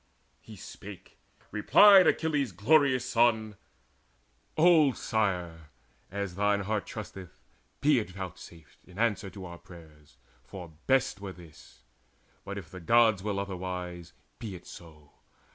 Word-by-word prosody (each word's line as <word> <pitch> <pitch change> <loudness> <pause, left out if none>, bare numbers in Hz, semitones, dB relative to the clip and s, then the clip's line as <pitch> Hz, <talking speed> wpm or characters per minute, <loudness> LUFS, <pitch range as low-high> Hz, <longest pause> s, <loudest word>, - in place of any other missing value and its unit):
He - - -13
spake: - - -12 0.3
replied 200 -4 +7
Achilles' 145 - 0
glorious 130 - +3
son: 110 -3 +2 1.0
"Old 155 -5 +5
sire, 90 -7 -2 0.4
as 100 -1 -4
thine 100 +1 +1
heart 105 +1 -2
trusteth, 95 - -9 0.4
be 145 -2 +4
it 105 - -5
vouchsafed 90 -3 -10
In 90 0 -15
answer 105 -3 0
to 95 0 -10
our 85 -1 -10
prayers; 80 -4 -16 0.3
for 85 +4 -10
best 130 -6 +1
were 100 -2 -6
this: 85 -5 -17 0.6
But 100 0 -6
if 85 -6 -9
the 95 - -9
Gods 110 +2 +3
will 100 0 -3
otherwise, 90 -3 -5 0.3
be 105 -5 -6
it 85 - -12
so. 75 -4 -14
100 Hz, 125 wpm, -29 LUFS, 90-115 Hz, 1.0 s, replied